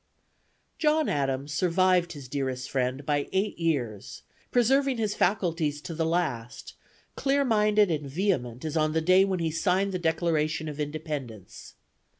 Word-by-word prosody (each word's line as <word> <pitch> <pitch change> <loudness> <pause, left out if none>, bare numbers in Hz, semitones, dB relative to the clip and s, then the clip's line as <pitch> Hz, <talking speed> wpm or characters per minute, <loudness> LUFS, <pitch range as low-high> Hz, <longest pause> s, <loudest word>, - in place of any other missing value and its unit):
John 310 0 +2
Adams 140 0 -1
survived 180 +2 +2
his 140 -4 -9
dearest 130 -1 -3
friend 130 +1 -1
by 145 -1 0
eight 195 +1 -1
years, 125 - -2 0.3
preserving 265 +2 +2
his 215 -2 -1
faculties 170 -7 0
to 170 - -6
the 160 0 -1
last, 145 -9 -2 0.4
clear 275 0 +1
minded 210 -4 +3
and 150 -3 -2
vehement 135 - -1
as 155 0 -3
on 155 -1 +1
the 160 - +2
day 185 +3 +5
when 190 -1 -1
he 165 -2 -1
signed 190 +4 +1
the 185 - -2
Declaration 160 -2 0
of 150 -1 -6
Independence. 145 - -6
160 Hz, 150 wpm, -27 LUFS, 145-190 Hz, 0.4 s, day